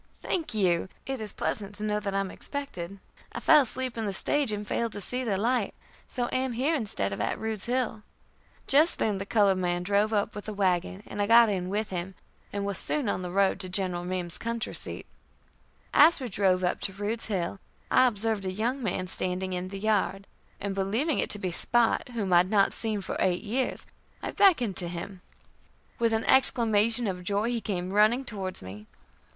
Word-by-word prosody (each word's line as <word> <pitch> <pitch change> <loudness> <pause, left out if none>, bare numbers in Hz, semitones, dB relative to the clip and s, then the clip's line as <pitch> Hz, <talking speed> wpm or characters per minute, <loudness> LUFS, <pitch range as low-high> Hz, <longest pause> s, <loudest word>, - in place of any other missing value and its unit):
"Thank 325 -10 -2
you. 185 -3 +2 0.2
It 270 -3 -3
is 210 -2 -3
pleasant 205 -1 -3
to 210 - -2
know 210 0 0
that 200 -2 -3
I 195 - +2
am 195 - -4
expected. 200 -11 -5 0.4
I - - -4
fell 305 -2 +6
asleep 255 -1 -2
in 220 - -1
the 200 - -2
stage, 280 +5 +1
and 210 0 -4
failed 230 -2 -1
to - - -5
see 250 +6 -2
the 210 -5 0
light, 235 +1 0 0.3
so 245 -1 -2
am 260 -1 0
here 265 +7 +1
instead 200 - -2
of - - -4
at - - -1
Rude's 220 -3 -3
Hill." 245 -3 -1 0.6
Just 305 +5 +4
then 205 -3 0
the 195 - -5
colored 200 -4 +3
man 175 -1 0
drove 205 +3 +2
up 205 -2 0
with 205 - -7
the 215 - -5
wagon, 185 0 0
and 205 - -4
I 205 - +1
got 230 0 +7
in 185 -3 -2
with 210 +2 -2
him, 185 +1 -4 0.4
and 200 0 -3
was 200 -1 0
soon 290 -6 +1
on 195 - -1
the 180 - -4
road 195 +2 +2
to 185 - -3
General 180 -2 0
Meem's 180 -1 -3
country 230 -1 -3
seat. - - -2 0.9
As 315 +2 +7
we 260 - -4
drove 190 -3 +1
up 180 - 0
to 195 - -2
Rude's 205 +4 -3
Hill, 190 -2 -2 0.3
I 255 - +6
observed 220 -2 0
a 185 - -2
young 235 +8 -1
man 185 -4 -2
standing 185 0 -2
in 180 0 -3
the 195 +1 -6
yard, 200 -1 0 0.3
and 200 -1 -3
believing 220 +11 0
it - - 0
to - - +3
be 185 -3 -3
Spot, 240 +7 +1
whom 210 -6 -2
I - - +8
had 180 +1 +4
not 200 -2 +3
seen 215 -3 -2
for - - -4
eight 180 -1 +1
years, 250 +5 -1 0.4
I - - -2
beckoned 250 - +3
to 175 - -2
him. 180 +2 -7 0.8
With 230 -1 +2
an 225 0 +1
exclamation 230 -3 +3
of 180 -3 -3
joy, 205 +4 0
he 240 -2 -1
came 185 -3 -3
running 215 +6 +4
towards 190 - -4
me. 100 +3 -9
205 Hz, 210 wpm, -28 LUFS, 185-230 Hz, 0.9 s, I